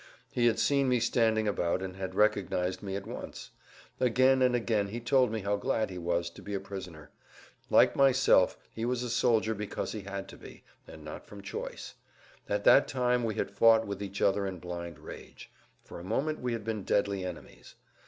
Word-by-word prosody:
He 120 Hz, -1 st, +2 dB
had 115 Hz, -, +2 dB
seen 140 Hz, -2 st, +2 dB
me 125 Hz, -1 st, +3 dB
standing 110 Hz, -2 st, +2 dB
about 95 Hz, -2 st, 0 dB
and 95 Hz, -1 st, -6 dB
had 95 Hz, -1 st, -5 dB
recognized 95 Hz, -3 st, +1 dB
me 95 Hz, -2 st, -4 dB
at 100 Hz, 0 st, -5 dB
once. -, -, -8 dB, 0.5 s
Again 130 Hz, +1 st, +3 dB
and 125 Hz, -1 st, +4 dB
again 110 Hz, -4 st, 0 dB
he 110 Hz, +4 st, -5 dB
told 125 Hz, 0 st, +2 dB
me 110 Hz, -1 st, -3 dB
how 100 Hz, +1 st, 0 dB
glad 110 Hz, -3 st, -1 dB
he 90 Hz, -, -6 dB
was 85 Hz, 0 st, -1 dB
to -, -, -13 dB
be 100 Hz, -, -5 dB
a -, -, -1 dB
prisoner. 95 Hz, -6 st, -9 dB, 0.6 s
Like -, -, +5 dB
myself 135 Hz, -8 st, +4 dB, 0.2 s
he 115 Hz, -, -5 dB
was 125 Hz, +1 st, -1 dB
a 120 Hz, -, -3 dB
soldier 115 Hz, -2 st, +2 dB
because 105 Hz, -1 st, -4 dB
he 110 Hz, -, -5 dB
had 100 Hz, 0 st, -6 dB
to -, -, -11 dB
be, -, -, -13 dB, 0.2 s
and 80 Hz, -1 st, -12 dB
not 75 Hz, -, -8 dB
from 100 Hz, -1 st, -11 dB
choice. -, -, -6 dB, 0.6 s
At 100 Hz, 0 st, 0 dB
that 140 Hz, -, +6 dB
time 125 Hz, -2 st, +1 dB
we 110 Hz, -2 st, -1 dB
had -, -, -2 dB
fought 115 Hz, +2 st, +5 dB
with 100 Hz, 0 st, -5 dB
each 100 Hz, -1 st, -4 dB
other 100 Hz, 0 st, +2 dB
in 95 Hz, -1 st, -5 dB
blind 85 Hz, -2 st, -7 dB
rage; 75 Hz, -, -11 dB, 0.3 s
for -, -, -10 dB
a -, -, -9 dB
moment 135 Hz, -, -1 dB
we 125 Hz, -1 st, -2 dB
had 115 Hz, -2 st, -4 dB
been 110 Hz, -1 st, -3 dB
deadly 100 Hz, -1 st, 0 dB
enemies. 90 Hz, -3 st, -9 dB
105 Hz, 200 wpm, -30 LUFS, 95-120 Hz, 0.6 s, that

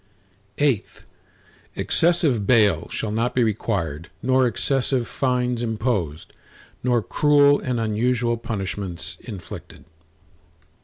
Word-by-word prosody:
VIII 140 Hz, -8 st, +2 dB, 0.9 s
Excessive 160 Hz, -, +2 dB
bail 105 Hz, -9 st, +3 dB
shall 110 Hz, -, -3 dB
not 115 Hz, +3 st, -1 dB
be 125 Hz, -, +4 dB
required 85 Hz, -7 st, -2 dB
nor 130 Hz, 0 st, +3 dB
excessive 125 Hz, +1 st, 0 dB
fines 125 Hz, -3 st, 0 dB
imposed, 105 Hz, -, -2 dB, 0.5 s
nor 120 Hz, -3 st, +1 dB
cruel 145 Hz, +5 st, +4 dB
and 125 Hz, -3 st, -2 dB
unusual 120 Hz, +2 st, +1 dB
punishments 100 Hz, -6 st, -5 dB
inflicted. 95 Hz, -, -10 dB
120 Hz, 95 wpm, -23 LUFS, 105-130 Hz, 0.9 s, be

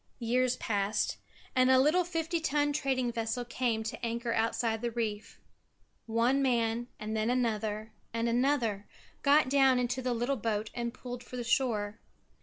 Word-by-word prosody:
Years 250 Hz, +1 st, +1 dB
passed 205 Hz, -2 st, -1 dB, 0.4 s
and 255 Hz, 0 st, +4 dB
a 260 Hz, -, +6 dB
little 305 Hz, +7 st, +4 dB
fifty 335 Hz, -1 st, -2 dB
ton 290 Hz, -2 st, +1 dB
trading 265 Hz, -4 st, 0 dB
vessel 230 Hz, +1 st, -2 dB
came 235 Hz, -2 st, -1 dB
to 220 Hz, -, -6 dB
anchor 235 Hz, 0 st, -1 dB
outside 225 Hz, 0 st, 0 dB
the 240 Hz, -, -1 dB
reef. 220 Hz, -2 st, -4 dB, 0.7 s
One 235 Hz, +5 st, +2 dB
man 235 Hz, -2 st, +1 dB
and 215 Hz, +1 st, -4 dB
then 220 Hz, +1 st, 0 dB
another 220 Hz, -3 st, -1 dB, 0.2 s
and 230 Hz, +1 st, -1 dB
another 235 Hz, -4 st, +1 dB, 0.3 s
got 290 Hz, 0 st, +5 dB
down 265 Hz, -1 st, +4 dB
into 250 Hz, +1 st, -1 dB
the 250 Hz, -1 st, -1 dB
little 245 Hz, +4 st, 0 dB
boat 215 Hz, -1 st, -2 dB
and 235 Hz, -1 st, -2 dB
pulled 245 Hz, 0 st, -8 dB
for 250 Hz, -, -8 dB
the 245 Hz, -, -3 dB
shore. 225 Hz, -4 st, 0 dB
240 Hz, 160 wpm, -31 LUFS, 225-260 Hz, 0.7 s, a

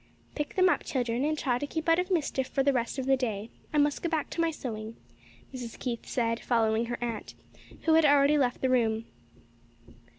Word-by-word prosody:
"Pick 295 Hz, -1 st, -4 dB
them 370 Hz, -1 st, +5 dB
up, 360 Hz, -, +2 dB
children, 245 Hz, -1 st, -1 dB
and 310 Hz, +1 st, 0 dB
try 245 Hz, -4 st, 0 dB
to 290 Hz, -, -3 dB
keep 320 Hz, +2 st, -4 dB
out 330 Hz, +1 st, +5 dB
of 365 Hz, +1 st, -1 dB
mischief 290 Hz, -7 st, 0 dB
for 270 Hz, -, 0 dB
the 280 Hz, 0 st, +3 dB
rest 235 Hz, +1 st, -1 dB
of 265 Hz, -, -2 dB
the 270 Hz, 0 st, +4 dB
day. 225 Hz, -4 st, -3 dB, 0.2 s
I 305 Hz, -, -1 dB
must 290 Hz, 0 st, +2 dB
go 340 Hz, -, -1 dB
back 315 Hz, -3 st, -2 dB
to 335 Hz, -, -1 dB
my 330 Hz, -, +2 dB
sewing," 225 Hz, -7 st, -6 dB, 0.6 s
Mrs. 245 Hz, -3 st, -7 dB
Keith 240 Hz, -3 st, -4 dB
said, 230 Hz, -1 st, 0 dB
following 225 Hz, -1 st, +1 dB
her 240 Hz, -, -3 dB
aunt, 230 Hz, -3 st, -5 dB, 0.5 s
who 325 Hz, -, +3 dB
had 320 Hz, 0 st, +6 dB
already 285 Hz, 0 st, +5 dB
left 250 Hz, -3 st, 0 dB
the 260 Hz, -, +2 dB
room. 225 Hz, -3 st, +1 dB
260 Hz, 210 wpm, -29 LUFS, 235-300 Hz, 0.6 s, had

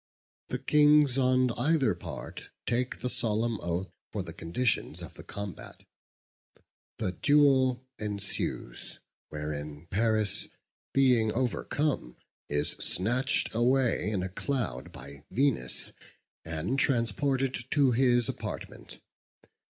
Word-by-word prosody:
The -, -, -2 dB
kings 150 Hz, -3 st, +5 dB
on 130 Hz, -1 st, +4 dB
either 130 Hz, -, +2 dB
part 85 Hz, -, -8 dB, 0.2 s
take 125 Hz, +1 st, -1 dB
the 125 Hz, -, -1 dB
solemn 115 Hz, -2 st, 0 dB
oath 85 Hz, +2 st, -2 dB, 0.2 s
for 100 Hz, -, -2 dB
the 85 Hz, -2 st, -8 dB
conditions 95 Hz, +11 st, -1 dB
of -, -, -8 dB
the -, -, -10 dB
combat. 100 Hz, -2 st, -7 dB, 1.1 s
The 95 Hz, -, -1 dB
duel 130 Hz, 0 st, +4 dB
ensues, 100 Hz, -, -4 dB, 0.3 s
wherein 75 Hz, 0 st, -5 dB
Paris 110 Hz, 0 st, +1 dB, 0.4 s
being 125 Hz, -5 st, +4 dB
overcome, 130 Hz, -, -1 dB, 0.3 s
is 75 Hz, 0 st, 0 dB
snatched 120 Hz, +8 st, 0 dB
away 120 Hz, -3 st, +2 dB
in 100 Hz, -4 st, -1 dB
a 95 Hz, -, -3 dB
cloud 105 Hz, -, -3 dB
by 70 Hz, 0 st, -10 dB
Venus, 135 Hz, +4 st, 0 dB, 0.5 s
and 85 Hz, -, -2 dB
transported 130 Hz, +1 st, +1 dB
to 140 Hz, -4 st, +4 dB
his 120 Hz, -1 st, +3 dB
apartment. -, -, -6 dB
120 Hz, 105 wpm, -30 LUFS, 95-130 Hz, 1.1 s, kings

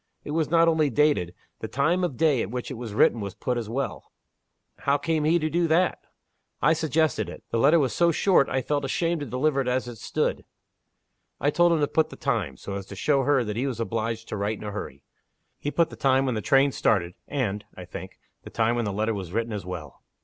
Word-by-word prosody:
It -, -, -6 dB
was 160 Hz, -1 st, 0 dB
not 165 Hz, 0 st, +4 dB
only 160 Hz, -3 st, +3 dB
dated. 120 Hz, -, +2 dB, 0.2 s
The -, -, -4 dB
time 155 Hz, +7 st, +1 dB
of 145 Hz, -9 st, -2 dB
day 150 Hz, -7 st, +3 dB
at -, -, -3 dB
which 125 Hz, +3 st, -5 dB
it -, -, -3 dB
was 115 Hz, -4 st, -7 dB
written 115 Hz, -, +4 dB
was 100 Hz, -3 st, -5 dB
put 125 Hz, -, -2 dB
as 115 Hz, -3 st, -4 dB
well." 135 Hz, +4 st, -4 dB, 0.7 s
"How 140 Hz, +1 st, +2 dB
came 155 Hz, +1 st, 0 dB
he 165 Hz, +3 st, +4 dB
to 155 Hz, -2 st, -1 dB
do 170 Hz, +2 st, +1 dB
that?" 170 Hz, +3 st, +2 dB, 0.6 s
"I 150 Hz, +4 st, +4 dB
suggested 155 Hz, -, 0 dB
it. -, -, -10 dB
The 115 Hz, -, +1 dB
letter 145 Hz, +7 st, +5 dB
was 135 Hz, -5 st, +1 dB
so 170 Hz, 0 st, +3 dB
short 180 Hz, -2 st, +3 dB
I 130 Hz, 0 st, -1 dB
felt 145 Hz, +1 st, -1 dB
ashamed 165 Hz, +5 st, 0 dB
to 145 Hz, -, -5 dB
deliver 135 Hz, +3 st, +1 dB
it 130 Hz, -, -4 dB
as 125 Hz, 0 st, 0 dB
it 120 Hz, -3 st, -8 dB
stood. -, -, -1 dB, 1.0 s
I 145 Hz, +3 st, +2 dB
told 175 Hz, +2 st, +4 dB
him 160 Hz, -, +1 dB
to 145 Hz, -, +3 dB
put 160 Hz, +1 st, +1 dB
the -, -, -10 dB
time 110 Hz, -, -2 dB
so 100 Hz, -, -7 dB
as 100 Hz, -1 st, -5 dB
to 100 Hz, -, -9 dB
show 140 Hz, +7 st, +2 dB
her 140 Hz, -3 st, +3 dB
that 105 Hz, -2 st, -4 dB
he 130 Hz, +4 st, 0 dB
was 125 Hz, -4 st, -4 dB
obliged 115 Hz, 0 st, -2 dB
to -, -, -3 dB
write 105 Hz, +2 st, -1 dB
in -, -, -10 dB
a 105 Hz, -, -4 dB
hurry. 70 Hz, -9 st, -7 dB, 0.6 s
He 145 Hz, -, -2 dB
put 165 Hz, +2 st, +1 dB
the -, -, -8 dB
time 135 Hz, 0 st, +2 dB
when 130 Hz, -, 0 dB
the 110 Hz, -, -2 dB
train 135 Hz, +5 st, +4 dB
started; 90 Hz, -8 st, +1 dB
and 110 Hz, -8 st, -2 dB
(I -, -, -8 dB
think) -, -, -9 dB, 0.2 s
the -, -, -10 dB
time 115 Hz, +1 st, +1 dB
when 120 Hz, -, 0 dB
the 100 Hz, -, -1 dB
letter 110 Hz, +3 st, 0 dB
was 95 Hz, -4 st, -6 dB
written 115 Hz, +2 st, -2 dB
as 100 Hz, -3 st, -5 dB
well." 85 Hz, -6 st, -7 dB
130 Hz, 245 wpm, -26 LUFS, 110-155 Hz, 1.0 s, letter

